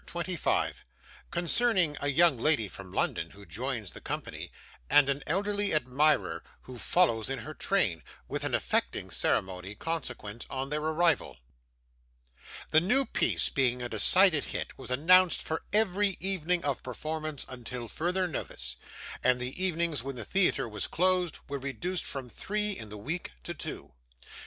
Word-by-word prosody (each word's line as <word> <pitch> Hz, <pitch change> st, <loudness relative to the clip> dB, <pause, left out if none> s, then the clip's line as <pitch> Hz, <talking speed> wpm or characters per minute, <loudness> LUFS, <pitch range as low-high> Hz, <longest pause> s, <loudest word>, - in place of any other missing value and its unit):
CHAPTER -, -, -8 dB
25 175 Hz, -1 st, -1 dB, 0.4 s
Concerning 180 Hz, -2 st, +2 dB
a 145 Hz, -, 0 dB
young 155 Hz, +2 st, +5 dB
Lady 120 Hz, -3 st, +2 dB
from 95 Hz, -1 st, -10 dB
London, -, -, -1 dB
who 100 Hz, +1 st, -14 dB
joins 110 Hz, +3 st, -4 dB
the -, -, -11 dB
Company, -, -, -5 dB, 0.4 s
and 145 Hz, -2 st, +6 dB
an 140 Hz, +1 st, 0 dB
elderly 205 Hz, +2 st, +1 dB
Admirer 150 Hz, +2 st, +2 dB, 0.2 s
who 125 Hz, -2 st, -10 dB
follows 115 Hz, -12 st, +2 dB
in 135 Hz, -, -2 dB
her 150 Hz, +6 st, -7 dB
Train; 110 Hz, -, +1 dB, 0.3 s
with -, -, -3 dB
an -, -, +1 dB
affecting -, -, -1 dB
Ceremony 95 Hz, +2 st, 0 dB
consequent 120 Hz, -7 st, -5 dB
on 135 Hz, +1 st, -3 dB
their 150 Hz, +1 st, -1 dB
Arrival 160 Hz, 0 st, +1 dB, 1.3 s
The 155 Hz, -, +6 dB
new 250 Hz, +10 st, +3 dB
piece -, -, +1 dB
being 125 Hz, -2 st, +1 dB
a -, -, -2 dB
decided 160 Hz, -, +5 dB
hit, -, -, -4 dB
was 130 Hz, -, -7 dB
announced 175 Hz, +7 st, +5 dB
for 160 Hz, -, -3 dB
every 205 Hz, -2 st, +2 dB
evening 180 Hz, -2 st, 0 dB
of 140 Hz, -3 st, 0 dB
performance 155 Hz, +2 st, -4 dB
until 125 Hz, -1 st, -6 dB
further 180 Hz, +7 st, 0 dB
notice, 65 Hz, -, -5 dB, 0.5 s
and 125 Hz, 0 st, +3 dB
the 125 Hz, +9 st, -3 dB
evenings 170 Hz, -6 st, +1 dB
when 135 Hz, +2 st, -5 dB
the 115 Hz, -3 st, -6 dB
theatre 190 Hz, -9 st, +2 dB
was 105 Hz, -3 st, -4 dB
closed, 180 Hz, -1 st, +1 dB
were 140 Hz, 0 st, -4 dB
reduced 165 Hz, +7 st, -3 dB
from 135 Hz, -2 st, -5 dB
three 210 Hz, -, -1 dB
in 110 Hz, -, -4 dB
the 105 Hz, -, -8 dB
week 150 Hz, -, -4 dB
to -, -, -4 dB
two. -, -, -6 dB
150 Hz, 155 wpm, -29 LUFS, 125-180 Hz, 1.3 s, and